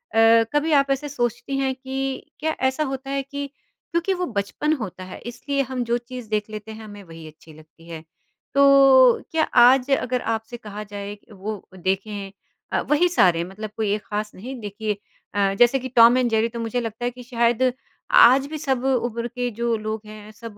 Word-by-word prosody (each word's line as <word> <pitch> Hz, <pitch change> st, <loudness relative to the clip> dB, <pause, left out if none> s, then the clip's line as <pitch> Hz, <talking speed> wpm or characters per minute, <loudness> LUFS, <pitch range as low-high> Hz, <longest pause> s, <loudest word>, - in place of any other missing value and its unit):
अ, 225 Hz, 0 st, +6 dB
कभी 295 Hz, +2 st, +1 dB
आप 275 Hz, -2 st, +4 dB
ऐसे 285 Hz, +2 st, -1 dB
सोचती 240 Hz, +1 st, -2 dB
हैं 270 Hz, -1 st, 0 dB
कि 265 Hz, 0 st, -5 dB
क्या 315 Hz, +1 st, -1 dB
ऐसा 265 Hz, +4 st, -1 dB
होता 270 Hz, -1 st, -5 dB
है 275 Hz, 0 st, -1 dB
कि 280 Hz, +1 st, -5 dB, 0.5 s
क्योंकि 340 Hz, +3 st, +1 dB
वो 360 Hz, -1 st, -2 dB
बचपन 230 Hz, -, -1 dB
होता 200 Hz, -, -5 dB
है 185 Hz, -, -9 dB
इसलिए 275 Hz, +4 st, -2 dB
हम 260 Hz, -1 st, -3 dB
जो 235 Hz, +1 st, +1 dB
चीज़ 245 Hz, -1 st, -9 dB
देख 215 Hz, -1 st, -1 dB
लेते 215 Hz, 0 st, -8 dB
हैं, 220 Hz, 0 st, -9 dB
हमें 205 Hz, -2 st, -11 dB
वही 165 Hz, -2 st, -11 dB
अच्छी 155 Hz, 0 st, -15 dB
लगती 155 Hz, +2 st, -18 dB
है। 160 Hz, -1 st, -8 dB, 0.5 s
तो 275 Hz, -3 st, +6 dB
क्या 320 Hz, -1 st, +2 dB
आज 255 Hz, +2 st, +6 dB
अगर 255 Hz, -2 st, +1 dB
आपसे 225 Hz, +1 st, -3 dB
कहा 210 Hz, -2 st, -8 dB
जाए 205 Hz, 0 st, -7 dB
वो 205 Hz, +1 st, -6 dB, 0.2 s
देखें 195 Hz, +2 st, -3 dB, 0.4 s
अ, -, -, +1 dB
वही 335 Hz, +4 st, +2 dB
सारे 175 Hz, -, +3 dB
मतलब 200 Hz, +4 st, -7 dB
कोई 210 Hz, -2 st, 0 dB
एक 210 Hz, -, -6 dB
खास 210 Hz, 0 st, -3 dB
नहीं। 255 Hz, +8 st, -7 dB
देखिए 210 Hz, 0 st, -4 dB, 0.4 s
अ, 200 Hz, -1 st, +2 dB
जैसे 240 Hz, +3 st, +5 dB
कि 260 Hz, 0 st, -6 dB
टॉम 235 Hz, +1 st, +7 dB
एंड 250 Hz, -1 st, +2 dB
जेरी 225 Hz, 0 st, +2 dB
तो 235 Hz, -, -7 dB
मुझे 230 Hz, +2 st, -2 dB
लगता 225 Hz, +1 st, -5 dB
है 245 Hz, -, 0 dB
कि 250 Hz, 0 st, -12 dB
शायद 240 Hz, +1 st, +1 dB, 0.4 s
आज 265 Hz, +3 st, +7 dB
भी 310 Hz, +2 st, -5 dB
सब 265 Hz, -4 st, -1 dB
उम्र 240 Hz, -3 st, 0 dB
के 245 Hz, +1 st, -3 dB
जो 235 Hz, +1 st, -1 dB
लोग 215 Hz, 0 st, -4 dB
हैं, 215 Hz, 0 st, -11 dB
सब 220 Hz, -1 st, -11 dB
235 Hz, 200 wpm, -23 LUFS, 210-265 Hz, 0.5 s, टॉम